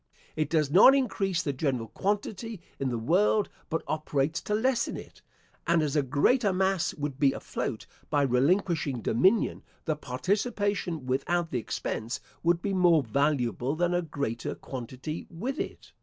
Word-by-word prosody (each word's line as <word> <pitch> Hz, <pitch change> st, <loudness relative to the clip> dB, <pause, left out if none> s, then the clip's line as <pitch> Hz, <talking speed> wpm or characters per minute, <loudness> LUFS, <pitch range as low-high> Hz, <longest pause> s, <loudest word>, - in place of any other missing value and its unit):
It 155 Hz, -2 st, -1 dB
does 155 Hz, -4 st, +1 dB
not 210 Hz, -, +8 dB
increase 195 Hz, -8 st, 0 dB
the 145 Hz, -, -1 dB
general 130 Hz, -5 st, -1 dB
quantity 205 Hz, +1 st, -2 dB, 0.2 s
in 135 Hz, -, 0 dB
the 120 Hz, -, -2 dB
world, 190 Hz, -, +2 dB, 0.2 s
but 165 Hz, -, -1 dB
operates 155 Hz, +1 st, -1 dB
to 210 Hz, -, -1 dB
lessen 245 Hz, +2 st, +1 dB
it; -, -, -12 dB, 0.5 s
and 170 Hz, -2 st, +3 dB
as 150 Hz, -1 st, -1 dB
a 150 Hz, -, +4 dB
greater 195 Hz, -, +2 dB
mass 190 Hz, -1 st, +1 dB
would 145 Hz, -2 st, -4 dB
be 140 Hz, -2 st, +4 dB
afloat -, -, -4 dB, 0.2 s
by 145 Hz, -1 st, +2 dB
relinquishing 140 Hz, -, +1 dB
dominion, 190 Hz, -, +2 dB, 0.2 s
the 155 Hz, -, 0 dB
participation 190 Hz, -, -1 dB
without 165 Hz, +6 st, 0 dB
the 125 Hz, -, 0 dB
expense 115 Hz, +1 st, -3 dB, 0.2 s
would 170 Hz, 0 st, +2 dB
be 200 Hz, -, -1 dB
more 175 Hz, -5 st, +4 dB
valuable 130 Hz, +1 st, 0 dB
than 175 Hz, +2 st, +1 dB
a 175 Hz, -, +2 dB
greater 140 Hz, -8 st, -3 dB
quantity 130 Hz, +5 st, -6 dB
with 230 Hz, +11 st, -4 dB
it. -, -, -6 dB
160 Hz, 155 wpm, -28 LUFS, 135-190 Hz, 0.5 s, not